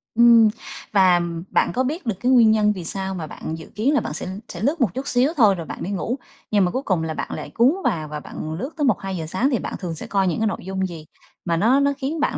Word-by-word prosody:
Ừm, 235 -1 +7 0.4
và 185 -3 +5 0.3
bạn - - +2
có 255 - +1
biết 300 +6 -3
được 225 -4 -1
cái 250 - +1
nguyên 235 -4 +6
nhân 210 -1 +3
vì 185 -3 -7
sao 190 +2 -3
mà 165 -4 -5
bạn 160 +1 -6
dự 160 - -12
kiến 245 +8 +1
là 290 - +4
bạn - - -5
sẽ 160 - -5 0.2
sẽ - - -7
lướt 285 +7 0
một 210 -8 +2
chút 270 +2 -5
xíu 255 +6 +2
thôi 210 -6 +5
rồi 170 -3 -6
bạn - - -6
đi 195 - -3
ngủ, 225 +6 -2 0.3
nhưng 205 -3 +4
mà 180 - 0
cuối 260 - -2
cùng 180 -8 0
là 160 -1 -2
bạn - - -4
lại - - -6
cuốn 245 +5 +4
vào 155 -2 0
và 150 0 -5
bạn 155 +1 -6
lướt 235 - -4
tới 295 - +1
1:00-2:00 195 -8 -1
sáng? 250 - +1
Thì 245 - +1
bạn - - -5
thường 175 -3 -4
sẽ - - -7
coi 195 -2 +1
những 175 - -1
cái 220 - +2
nội 190 - -4
dung 190 0 -2
gì 165 -3 -9 0.4
mà 170 -2 +1
nó 235 +10 +4
nó 280 0 +2
khiến 290 +3 -3
bạn - - 0
210 Hz, 280 wpm, -22 LUFS, 175-255 Hz, 0.4 s, Ừm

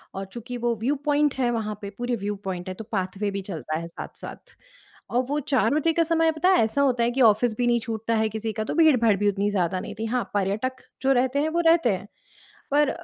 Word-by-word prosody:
और 195 - -4
चूँकि 245 +1 -6
वो 240 -1 +1
व्यू 275 +5 +1
पॉइंट 295 -1 +2
है 255 -2 +1
वहाँ 215 -2 -2
पे, 200 - -5
पूरे 245 +4 -3
व्यू 205 0 -3
पॉइंट 180 -1 -4
है, 185 - -3
तो 220 - -7
पाथवे 195 0 -2
भी 200 - -3
चलता 155 -3 -3
है 170 - -6
साथ-साथ। 170 - -10 0.6
और 250 +2 +2
वो 295 +1 0
4 275 -1 +1
बजे 320 +2 +2
का 335 - +3
समय 325 0 +2
पता 315 +4 +1
है 370 -10 +5
ऐसा 225 +6 +1
होता 250 -4 +2
है 235 - +2
कि 260 +2 -1
ऑफ़िस 220 0 +4
भी 245 -1 +1
नहीं 240 0 +3
छूटता 225 0 -2
है 220 0 +2
किसी 220 0 -4
का, 215 - -2
तो - - -4
भीड़-भाड़ 250 -10 +5
भी 205 +1 +2
उतनी 200 +1 0
ज़्यादा 185 -2 0
नहीं 210 +1 -7
थी। 225 - -2
हाँ, 240 +2 0
पर्यटक 210 +6 -1 0.2
जो 270 - +2
रहते 260 +2 +1
हैं 305 +2 +1
वो 335 +2 -1
रहते 330 -6 +5
हैं। 190 - -9 0.6
पर 295 0 +4
235 Hz, 245 wpm, -25 LUFS, 205-270 Hz, 0.6 s, है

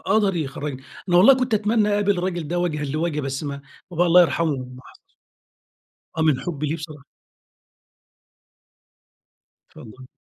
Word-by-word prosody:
قدر 200 -4 +2
يخرّجني. 140 -3 -5 0.3
أنا 175 - +4
والله 220 +9 +8
كنت 255 -2 -1
أتمنى 215 0 +2
أقابل 205 -2 +1
الرجل 175 -3 -3
ده 175 +2 -2
وَجهًا 155 -4 -2
لوَجه 155 +2 -2
بس 135 +1 -4
ما 140 -1 -5 0.3
بابايا 175 +1 +1
الله 175 +1 +7
يرحمه 165 -3 +1 0.2
محت 130 - -16 1.2
آه 160 - 0
من 155 -5 +2
حُبّي 155 -4 -4
ليه 155 +3 -2
بصراحة. 150 -3 -10 2.7
اتفضّلي. 130 +4 -13
165 Hz, 135 wpm, -22 LUFS, 145-185 Hz, 2.7 s, والله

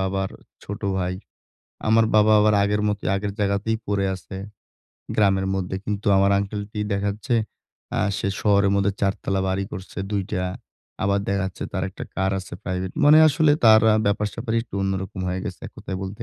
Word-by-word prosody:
বাবার 95 0 -1 0.3
ছোট 100 - -6 0.2
ভাই। 90 0 -1 0.7
আমার 110 +1 +5
বাবা 110 0 +5
আবার 105 0 +4
আগের 105 +1 +1
মতোই, 105 0 -2
আগের 100 +1 -2
জাগাতেই 100 +2 0
পরে 100 -1 0
আছে, 95 +1 -10 0.8
গ্রামের 95 -2 +3
মধ্যে 95 0 -2
কিন্তু 105 -1 -3
আমার 100 +1 +4
আঙ্কেলটি 105 +1 -4
দেখাচ্ছে 100 +5 -1 0.6
আ - - +2 0.2
সে 100 - -1
শহরের 100 -2 +3
মধ্যে 100 0 +2
৪ 100 -1 +2
তালা 95 0 0
বাড়ি 95 +1 -1
করছে 95 +1 -8
২ 100 -2 0
টা। 90 - -1 0.6
আবার 100 0 +2
দেখা-যাচ্ছে 95 -1 -2
তার 95 - -2
একটা - - -8
car 95 0 0
আছে 95 -2 -8
private, 95 0 -3
মানে 150 +2 +8
আসলে 155 +1 +3
তার 110 -1 +8
আ - - +4
ব্যাপার-স্যাপারই 110 +3 -1
একটু 115 - -13
অন্যরকম 95 0 -3
হয়ে 90 +1 -2
গেছে - - -6
এক - - -12
কথায় 95 - -5
বলতে 100 +4 -7
100 Hz, 175 wpm, -23 LUFS, 95-105 Hz, 0.8 s, মানে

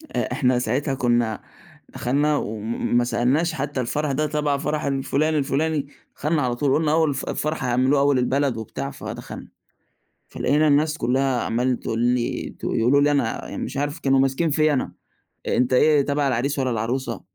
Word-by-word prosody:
آآ - - -1
إحنا 125 -1 +2
ساعتها 130 +4 -1
كُنّا 120 -4 0 0.5
دخَلنا 145 +4 0
وم 110 +1 -2
ما 120 - +4
سألناش 130 +8 +1
حتّى 140 -2 -3
الفَرَح 145 +4 -1
ده 150 +3 0
تَبَع 150 -1 0
فَرَح 150 +1 -2
الفُلان 140 +3 0
الفُلاني، 145 +1 0 0.3
دخَلنا 150 +1 0
على 125 -3 0
طول، 135 +2 +1
قُلنا 155 -1 +2
أول 160 -1 +3
الف 140 -1 -3
الفَرَح 155 -1 -2
هيعملوه 130 +3 +2
أول 140 -1 +3
البلد 130 0 0
وبتاع 110 -1 -5
فدخَلنا، - - -8 0.8
فلقينا 150 +3 +1
الناس 150 +2 +2
كُلّها 130 0 +1
عمّالة 125 +3 0
تقول 115 - -4
لي 120 0 0
ت - - -8
يقولوا 125 +5 +2
لي 145 +1 +3
أنا 140 -6 -1
مش - - -5
عارف 145 +3 -2
كانوا 135 -3 +2
ماسكين 135 +5 +1
فيّا 155 +1 +3
أنا: 135 - -1 0.6
"أنت 125 +1 +1
إيه 150 +2 +5
تَبَع 140 0 0
العريس 135 +3 -1
والّا 130 -1 0
العروسة؟" 115 +2 -2
135 Hz, 170 wpm, -23 LUFS, 125-150 Hz, 0.8 s, إيه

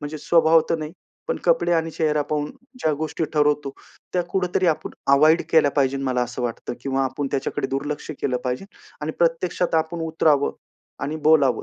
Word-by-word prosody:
म्हणजे 150 +1 -6
स्वभाव 165 +1 +4
तर 165 - +3
नाही, 155 +1 -6 0.4
पण - - 0
कपडे - - +3
आणि 165 -1 +1
चेहरा 150 -2 +1
पाहून 150 0 -2 0.3
ज्या 155 - +2
गोष्टी 155 +2 -2
ठरवतो, 150 -2 +2 0.4
त्या 180 - +1
कुठेतरी 185 -1 0
आपण 160 -3 0 0.2
अव्हॉइड 155 +4 +5
केल्या 150 -3 +5
पाहिजे 135 -1 +1
मला 130 -2 0
असं 125 +1 -4
वाटतं 120 0 -4
किंवा 135 0 0
आपण 135 +2 -2
त्याच्याकडे 135 0 -2
दुर्लक्ष 145 +3 -3
केलं 125 -2 0
पाहिजे 125 +7 -2 0.4
आणि 155 +1 -3
प्रत्यक्षात 170 +1 +1
आपण 160 +1 -1
उतरावं 155 -3 +2 0.5
आणि 150 +2 -3
बोलावं. 140 -7 +4
150 Hz, 170 wpm, -23 LUFS, 140-165 Hz, 0.5 s, अव्हॉइड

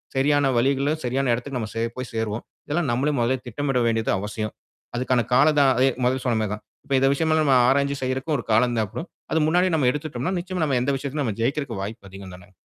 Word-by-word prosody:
சரியான 145 +2 +3
வழிகள்ல 140 +3 +1
சரியான 130 +2 0
எடத்துக்கு 125 +2 -3
நாம 110 -2 -4
சே 115 - 0
போய் 130 -1 -5
சேருவோம். 110 0 -2 0.2
இதெல்லாம் 150 -1 -1
நம்மளே 135 +5 +1
மொதலே 120 +3 +1
திட்டமிட 135 +2 -1
வேண்டியது 115 -1 0
அவசியம். 105 +2 -4 0.4
அதுக்கான 125 0 +1
காலம் 150 +4 +5
தா 140 - +6 0.2
ஏ 135 - +4
மொதல்லே 130 +1 +1
சொன்னமாரி 110 -4 0
தான். 105 0 -7 0.2
இப்போ 135 - -1
இந்த 135 - +3
விஷயம் 160 +3 +1
எல்லாம் 155 -1 +2
நாம 130 - +6
ஆராய்ஞ்சி 140 +1 +2
செய்யிறதுக்கு 130 +4 -1
ஒரு 120 - -5
காலம் 120 +2 +3
தேவப்படும், 110 - -4 0.2
அது 160 - +2
முன்னாடியே 180 +2 +2
நாம 140 -5 +2
எடுத்துட்டம்னா, 150 +3 -3
நிச்சயமா 180 -1 -3
நம்ம 135 -4 +1
எந்த 140 +2 +1
விஷயத்திலும் 140 +1 -3
நம்ம 110 -4 -3
ஜெயிக்கிறக்கு 130 -3 -1
வாய்ப்பு 100 -1 -8
அதிகம் 95 -1 -10
தான! 90 +1 -16
130 Hz, 210 wpm, -24 LUFS, 115-145 Hz, 0.4 s, தா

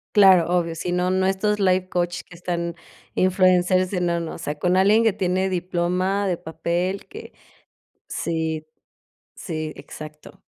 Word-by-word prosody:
Claro, 190 -4 +7
obvio, 165 -1 -2
sí, 170 +2 -4
no, 180 +1 +1
no. 185 0 +2
Estos 205 +2 0
life 185 -1 +2
coach 175 -1 -1
que - - -15
están 170 -1 -3 0.4
Influencers, 185 0 +3
sí, 185 - -1
no, 170 -1 +1
no. 165 -1 -5
O - - -9
sea, 150 -2 -4
con 180 +4 +2
alguien 210 +4 +5
que 220 - +4
tiene 185 0 0
diploma 185 +2 0
de 180 -3 0
papel, 170 +4 -3
que 435 +2 -11 0.8
Sí, 160 -1 -2 0.7
sí, 155 -3 -5
exacto. 155 0 -11
180 Hz, 155 wpm, -23 LUFS, 170-190 Hz, 0.8 s, Claro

